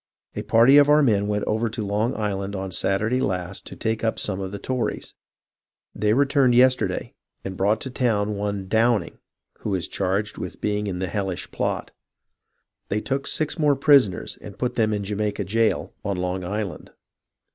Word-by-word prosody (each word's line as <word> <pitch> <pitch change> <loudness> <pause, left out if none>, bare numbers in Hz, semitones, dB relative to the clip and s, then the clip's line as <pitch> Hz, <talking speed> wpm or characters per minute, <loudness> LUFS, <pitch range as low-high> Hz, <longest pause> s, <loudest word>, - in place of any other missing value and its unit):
A - - -2
party 120 +5 +6
of 145 0 +5
our 150 0 +6
men 105 -5 +2
went 105 0 -1
over 110 +2 0
to 110 -1 -4
Long 105 +4 0
Island 100 -2 -2
on 95 -1 -4
Saturday 110 +8 0
last 90 -2 -3
to - - -9
take 110 0 -2
up 110 - 0
some 100 -2 -3
of 95 -1 -4
the 100 - -5
Tories; 125 +4 -3 0.8
they 105 +1 +1
re 140 +4 +4
turned 135 -3 +3
yesterday, 130 +1 +2 0.3
and 95 -1 -4
brought 105 +4 +2
to 130 - -5
town 105 -5 0
one 100 -1 -3
Downing, 115 +2 +1 0.4
who 100 - -2
is 90 - -2
charged 100 +2 -2
with - - -6
being 105 0 -1
in 95 -2 -3
the 95 +1 -2
hellish 95 -1 -3
plot. - - -2 1.0
They 105 - 0
took 135 +4 -2
six 155 +2 -1
more 145 -2 +4
prisoners 135 - +3
and 100 - -10
put 125 -1 -1
them 110 -2 +1
in 105 -1 -1
Jamaica 105 +1 -2
jail, 110 +4 0
on 100 -2 -2
Long 90 +1 -2
Island. 100 +1 -4
105 Hz, 180 wpm, -24 LUFS, 100-120 Hz, 1.0 s, party